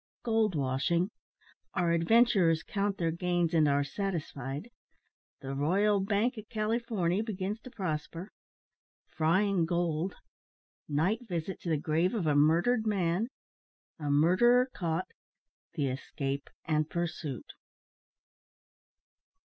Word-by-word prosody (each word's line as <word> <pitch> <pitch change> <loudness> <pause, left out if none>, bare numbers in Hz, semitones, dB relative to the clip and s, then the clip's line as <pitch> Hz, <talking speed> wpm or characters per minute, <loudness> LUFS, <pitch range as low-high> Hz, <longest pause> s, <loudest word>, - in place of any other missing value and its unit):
GOLD 220 -5 +1
WASHING 145 +7 0 0.6
OUR 175 -2 +2
ADVENTURERS 170 -2 +4
COUNT 200 -1 -1
THEIR 165 -2 0
GAINS, 175 0 0
AND 155 -2 +4
ARE 145 0 +3
SATISFIED 150 - -4 0.7
THE 135 0 -5
"R'YAL 195 +9 +2
BANK 215 +5 0
O' - - -8
CALYFORNY" 215 -4 0
BEGINS 210 -1 -3
TO 255 - -11
PROSPER 170 -1 -4 0.7
FRYING 175 +2 +1
GOLD 170 +1 -1 0.7
NIGHT 190 - 0
VISIT 175 0 -3
TO 175 - -4
THE 160 - +2
GRAVE 160 +7 +1
OF 200 -7 -1
A 150 -2 +2
MURDERED 170 +11 +3
MAN 190 0 +1 0.7
A 150 -2 -3
MURDERER 240 - +4
CAUGHT 170 0 -2 0.6
THE 145 -5 0
ESCAPE 135 +1 -4 0.2
AND 155 -1 0
PURSUIT. 170 - -3
175 Hz, 110 wpm, -30 LUFS, 155-205 Hz, 0.7 s, ADVENTURERS